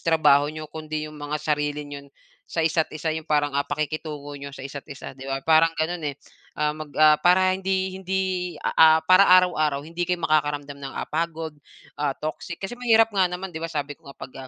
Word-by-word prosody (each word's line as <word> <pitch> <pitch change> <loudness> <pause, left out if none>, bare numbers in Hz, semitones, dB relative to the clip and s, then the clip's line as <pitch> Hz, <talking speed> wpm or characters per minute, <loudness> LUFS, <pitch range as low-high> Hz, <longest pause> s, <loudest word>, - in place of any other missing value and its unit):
trabaho 150 -3 +4
niyo 155 0 -6
kundi 155 -1 -4
'yong 155 0 -9
mga 145 +1 -3
sarili 150 -1 -2
niyo 140 -1 -9 0.4
sa 165 -1 -1
isa't 160 0 +1
isa, 155 +1 -3
'yong 160 0 -6
parang, 145 -1 +1
ah, 140 +1 -1
pakikitungo 150 -1 -4
n'yo 140 - -6
sa 140 -1 -10
isa't 140 +1 -8
isa, 140 -2 -8
'di 135 0 -10
ba, 135 0 -3
parang 165 0 +4
gano'n, 160 -1 -1
eh. 140 - -5 0.4
Ah, 150 0 +1
mag 155 0 -8
ah, 155 0 +6
para 185 +1 +4
hindi 190 0 -1
hindi, 190 0 -1 0.4
a 160 0 +6
ah, - - 0
para 185 +4 +6
araw-araw 155 -6 +4
hindi 170 +2 -4
kayo 175 -2 -1
makakaramdam 145 -2 0
ng, 135 -1 -6
ah, - - -2
pagod, 160 0 -3 0.5
ah, 145 -2 0
toxic. 155 +3 -5
Kasi 195 +4 -6
mahirap 225 -2 +4
nga 190 -2 +3
naman, 180 +1 -6
'di 160 - -6
ba, 165 - -3
sabi 145 -3 -3
ko 140 - -17
nga, 140 - -12
pag, 130 - -10
155 Hz, 210 wpm, -24 LUFS, 145-170 Hz, 0.5 s, ah